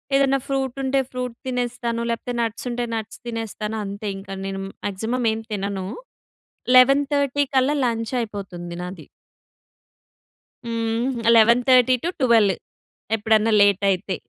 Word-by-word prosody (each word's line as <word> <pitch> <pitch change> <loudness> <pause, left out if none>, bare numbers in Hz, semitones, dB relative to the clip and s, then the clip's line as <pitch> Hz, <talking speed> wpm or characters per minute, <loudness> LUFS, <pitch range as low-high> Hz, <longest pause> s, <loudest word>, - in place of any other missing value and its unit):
ఏదన్నా 275 0 +3
ఫ్రూట్ 270 -2 -2
ఉంటే 270 +1 +1
ఫ్రూట్ 250 -2 -4
తినేస్తాను, 245 -2 -2
లేకపోతే 240 +1 -3
నట్స్ 230 +1 -3
ఉంటే 240 0 -2
నట్స్ 225 0 -6
తినేస్తాను 220 -1 -4
అంతే 200 +2 -6
ఇంకా. 195 0 -8
నేను 195 0 -4 0.2
మాక్సిమం 225 +5 -2
ఏం 220 - -4
తినను. 195 -2 -3 0.9
11:30 280 +2 +4
కల్లా 265 +3 +3
లంచ్ 230 0 -1
అయిపోతుంది 185 -6 -6
నాది. 180 -2 -8 1.6
హ్మ్. 230 +1 -1
11:30-12, 245 - +4 0.6
ఎప్పుడన్నా 220 +1 +2
లేట్ 200 -1 +4
అయితే. 185 0 -2
230 Hz, 110 wpm, -22 LUFS, 205-255 Hz, 1.6 s, 11:30